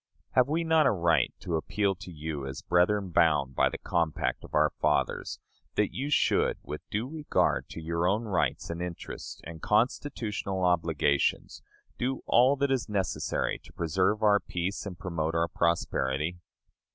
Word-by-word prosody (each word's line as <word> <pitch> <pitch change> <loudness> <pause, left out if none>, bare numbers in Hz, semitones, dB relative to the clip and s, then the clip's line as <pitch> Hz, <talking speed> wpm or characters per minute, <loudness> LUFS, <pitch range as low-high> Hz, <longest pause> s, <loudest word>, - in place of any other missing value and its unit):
Have 125 0 +4
we 160 +3 0
not 160 -3 +4
a - - +4
right 85 -4 +2
to 85 -3 -1
appeal 100 +5 0
to 95 0 -11
you, 75 -3 -5
as 65 0 -7
brethren 90 +2 +2
bound 75 -5 +3
by - - +3
the - - -5
compact 85 -3 -1
of - - -8
our - - +4
fathers, - - 0 0.4
that 105 -1 +1
you 140 +3 -3
should, 150 - +2
with - - -6
due 110 +4 -2
regard 150 +1 0
to - - -7
your 85 +2 -1
own 105 +5 +1
rights 100 -5 -1
and 85 +1 -5
interests 90 -1 -6
and 80 -1 -9
constitutional 105 -4 0
obligations, 80 -5 +1 0.4
do 130 +2 -1
all 130 +4 +5
that 140 0 0
is 130 -4 0
necessary 100 -3 -1
to - - -17
preserve 95 +6 0
our 105 -1 +5
peace 95 +4 -3
and 90 -3 -7
promote 80 -2 -2
our 85 0 +2
prosperity? 85 -1 0
90 Hz, 165 wpm, -29 LUFS, 85-110 Hz, 0.4 s, all